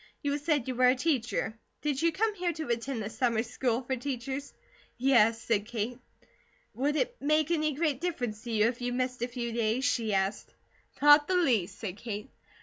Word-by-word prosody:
You 285 Hz, 0 st, 0 dB
said 290 Hz, -4 st, 0 dB
you 260 Hz, -, -1 dB
were 250 Hz, +1 st, +4 dB
a 250 Hz, -, +5 dB
teacher. 245 Hz, -6 st, -1 dB, 0.2 s
Did 290 Hz, -2 st, 0 dB
you 335 Hz, 0 st, +3 dB
come 425 Hz, +6 st, 0 dB
here 360 Hz, -3 st, -1 dB
to 315 Hz, -4 st, -6 dB
attend 235 Hz, 0 st, -2 dB
the 205 Hz, -, -4 dB
Summer 230 Hz, -3 st, +1 dB
School 245 Hz, +1 st, -1 dB
for 260 Hz, +1 st, -1 dB
Teachers?" 265 Hz, +2 st, -4 dB, 0.5 s
"Yes," 235 Hz, -3 st, +4 dB
said 215 Hz, -2 st, 0 dB
Kate. 235 Hz, +1 st, -3 dB, 0.7 s
"Would 285 Hz, +4 st, 0 dB
it 485 Hz, +8 st, 0 dB
make 305 Hz, +2 st, +2 dB
any 310 Hz, -3 st, +1 dB
great 295 Hz, -3 st, 0 dB
difference 245 Hz, -12 st, -3 dB
to 235 Hz, -, -4 dB
you 215 Hz, -1 st, +3 dB
if 235 Hz, +1 st, -1 dB
you 245 Hz, 0 st, -1 dB
missed 250 Hz, -1 st, -2 dB
a 240 Hz, -, 0 dB
few 240 Hz, -1 st, -4 dB
days?" 230 Hz, +3 st, 0 dB
she 230 Hz, -3 st, +1 dB
asked. 195 Hz, +2 st, -2 dB, 0.5 s
"Not 295 Hz, 0 st, +8 dB
the 370 Hz, -, +1 dB
least," 245 Hz, -, +2 dB
said 200 Hz, -4 st, -5 dB
Kate. 215 Hz, +2 st, -6 dB
250 Hz, 195 wpm, -29 LUFS, 230-290 Hz, 0.7 s, Not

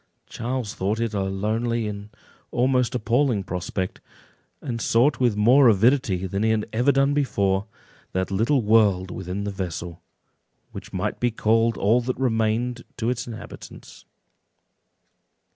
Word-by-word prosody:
Charles 120 Hz, -2 st, -4 dB
thought 100 Hz, +4 st, -2 dB
it 115 Hz, -2 st, -1 dB
a 100 Hz, -, -1 dB
lonely 110 Hz, +4 st, -1 dB
and 100 Hz, 0 st, -7 dB, 0.4 s
almost 125 Hz, 0 st, +1 dB
appalling 120 Hz, -1 st, +1 dB
prospect, 90 Hz, +1 st, -4 dB, 0.6 s
and 120 Hz, -5 st, -5 dB
sought 125 Hz, +6 st, +2 dB
with 120 Hz, -4 st, +2 dB
more 125 Hz, +6 st, +6 dB
avidity 110 Hz, -3 st, +3 dB
than 100 Hz, +2 st, -3 dB
he 110 Hz, -, +2 dB
had 110 Hz, -1 st, 0 dB
ever 125 Hz, +5 st, +3 dB
done 140 Hz, +1 st, +2 dB
before, 100 Hz, -8 st, 0 dB, 0.4 s
that 95 Hz, +1 st, -2 dB
little 115 Hz, +7 st, +2 dB
world 105 Hz, -4 st, +3 dB
within 95 Hz, +2 st, -5 dB
the 100 Hz, -, -3 dB
vessel, 85 Hz, -3 st, -5 dB, 0.7 s
which -, -, -9 dB
might -, -, -3 dB
be 120 Hz, -, +2 dB
called 115 Hz, +1 st, +1 dB
all 115 Hz, +5 st, +3 dB
that 125 Hz, +1 st, -3 dB
remained 120 Hz, 0 st, 0 dB
to 120 Hz, 0 st, 0 dB
its 125 Hz, -1 st, -4 dB
inhabitants. 115 Hz, -2 st, -11 dB
110 Hz, 140 wpm, -24 LUFS, 100-125 Hz, 0.7 s, more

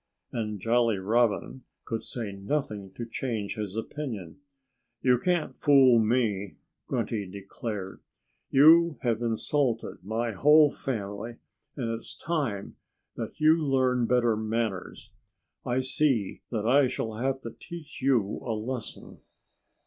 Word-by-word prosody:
And 105 Hz, -4 st, -3 dB
Jolly 115 Hz, 0 st, +2 dB
Robin 115 Hz, +5 st, +1 dB, 0.2 s
could 115 Hz, -1 st, -3 dB
say 115 Hz, -5 st, -5 dB
nothing 100 Hz, -1 st, -3 dB
to 120 Hz, -, -5 dB
change 115 Hz, -3 st, -3 dB
his 105 Hz, -2 st, -5 dB
opinion. 115 Hz, -, -5 dB, 0.6 s
"You 125 Hz, -2 st, +4 dB
can't 175 Hz, +2 st, 0 dB
fool 135 Hz, -4 st, +6 dB
me," 110 Hz, -4 st, 0 dB, 0.3 s
Grunty 105 Hz, -4 st, -2 dB
declared. 100 Hz, +1 st, -6 dB, 0.5 s
"You 160 Hz, +3 st, +6 dB
have 115 Hz, -2 st, +1 dB
insulted 120 Hz, -1 st, -1 dB
my 115 Hz, +4 st, -1 dB
whole 150 Hz, +7 st, +6 dB
family. 110 Hz, -2 st, -4 dB, 0.4 s
And 120 Hz, -4 st, -2 dB
it's 115 Hz, 0 st, -5 dB
time 140 Hz, -, -2 dB, 0.4 s
that -, -, -6 dB
you 155 Hz, +1 st, +5 dB
learned 130 Hz, -3 st, +2 dB
better 120 Hz, -2 st, +3 dB
manners. 110 Hz, -2 st, -3 dB, 0.6 s
I 125 Hz, +1 st, +1 dB
see 130 Hz, -6 st, 0 dB
that 110 Hz, -3 st, -2 dB
I 135 Hz, +3 st, +5 dB
shall 110 Hz, -2 st, -3 dB
have 135 Hz, +2 st, -1 dB
to 115 Hz, -, -6 dB
teach 160 Hz, -5 st, -10 dB
you 125 Hz, -7 st, +2 dB
a 115 Hz, -3 st, -2 dB
lesson." 115 Hz, +1 st, -5 dB
115 Hz, 125 wpm, -28 LUFS, 105-135 Hz, 0.6 s, fool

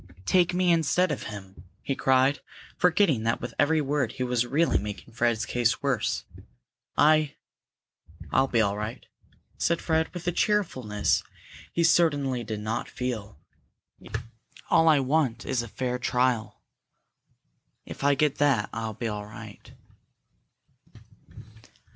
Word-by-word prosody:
"Take 180 Hz, -, +3 dB
me 180 Hz, 0 st, +2 dB
instead 170 Hz, +2 st, +2 dB
of -, -, -4 dB
him!" 95 Hz, -4 st, -10 dB, 0.2 s
he 135 Hz, -, -2 dB
cried, 130 Hz, +2 st, +3 dB, 0.4 s
forgetting 175 Hz, -, +3 dB
that 115 Hz, +1 st, 0 dB
with 125 Hz, -, -6 dB
every 155 Hz, +2 st, +3 dB
word 140 Hz, -4 st, -1 dB
he 130 Hz, -, -3 dB
was 125 Hz, -1 st, 0 dB
really 155 Hz, +7 st, +2 dB
making 105 Hz, +2 st, -7 dB
Fred's 120 Hz, -1 st, +1 dB
case 120 Hz, +1 st, 0 dB
worse. 135 Hz, -5 st, 0 dB, 0.7 s
"I 155 Hz, 0 st, +4 dB, 0.5 s
" -, -, -19 dB
"I'll 135 Hz, +1 st, +4 dB
be 115 Hz, -3 st, +2 dB
all 100 Hz, -2 st, +1 dB
right," 105 Hz, +2 st, -5 dB, 0.5 s
said 170 Hz, 0 st, +1 dB
Fred, 160 Hz, -1 st, 0 dB
with 175 Hz, -1 st, -8 dB
a -, -, +3 dB
cheerfulness 130 Hz, -, 0 dB, 0.5 s
he 170 Hz, -, 0 dB
certainly 145 Hz, -7 st, +2 dB
did 110 Hz, -1 st, -5 dB
not 110 Hz, +1 st, -3 dB
feel. 110 Hz, -, -4 dB, 1.3 s
"All 165 Hz, -2 st, +5 dB
I 150 Hz, -2 st, +5 dB
want 130 Hz, -3 st, 0 dB
is 130 Hz, -3 st, 0 dB
a 120 Hz, -, -7 dB
fair 125 Hz, +3 st, -3 dB
trial. 125 Hz, -3 st, 0 dB, 1.2 s
If -, -, -9 dB
I 140 Hz, 0 st, +4 dB
get 150 Hz, 0 st, +1 dB
that, 135 Hz, -8 st, +2 dB
I'll 110 Hz, -1 st, -4 dB
be 115 Hz, +2 st, -3 dB
all 105 Hz, -1 st, -5 dB
right." 105 Hz, -1 st, -11 dB
130 Hz, 135 wpm, -27 LUFS, 115-155 Hz, 1.3 s, All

